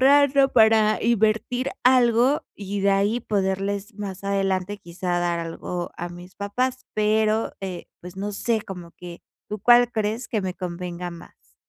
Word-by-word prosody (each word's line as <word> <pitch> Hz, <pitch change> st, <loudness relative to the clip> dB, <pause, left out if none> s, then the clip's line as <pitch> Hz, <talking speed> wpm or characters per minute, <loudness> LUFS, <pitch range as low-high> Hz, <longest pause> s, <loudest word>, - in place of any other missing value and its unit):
ahorrando, 275 Hz, 0 st, +5 dB
para 220 Hz, -2 st, +4 dB
invertir 230 Hz, +3 st, +1 dB
algo 250 Hz, +2 st, +4 dB
y 200 Hz, 0 st, -4 dB
de 200 Hz, +1 st, +3 dB
ahí 200 Hz, +4 st, +2 dB
poderles, 200 Hz, +1 st, -2 dB
más 195 Hz, -2 st, -6 dB
adelante 195 Hz, 0 st, 0 dB
quizá, 175 Hz, 0 st, -3 dB
dar 175 Hz, -1 st, 0 dB
algo 170 Hz, +1 st, -4 dB
a 175 Hz, -, -4 dB
mis 175 Hz, +1 st, -12 dB
papás, 250 Hz, +6 st, -2 dB
pero, 215 Hz, +1 st, +1 dB
eh, 185 Hz, -3 st, -6 dB
pues 180 Hz, +1 st, -10 dB
no 205 Hz, +2 st, -3 dB
sé, 225 Hz, +2 st, 0 dB
como 180 Hz, -4 st, -9 dB
que, 175 Hz, -1 st, -10 dB, 0.3 s
¿tú 210 Hz, -, -4 dB
cuál 240 Hz, +2 st, +6 dB
crees 220 Hz, +2 st, -2 dB
que 215 Hz, -3 st, -1 dB
me 185 Hz, -1 st, -2 dB
convenga 180 Hz, -1 st, -5 dB
más? 65 Hz, -, -15 dB
200 Hz, 155 wpm, -24 LUFS, 180-225 Hz, 0.3 s, cuál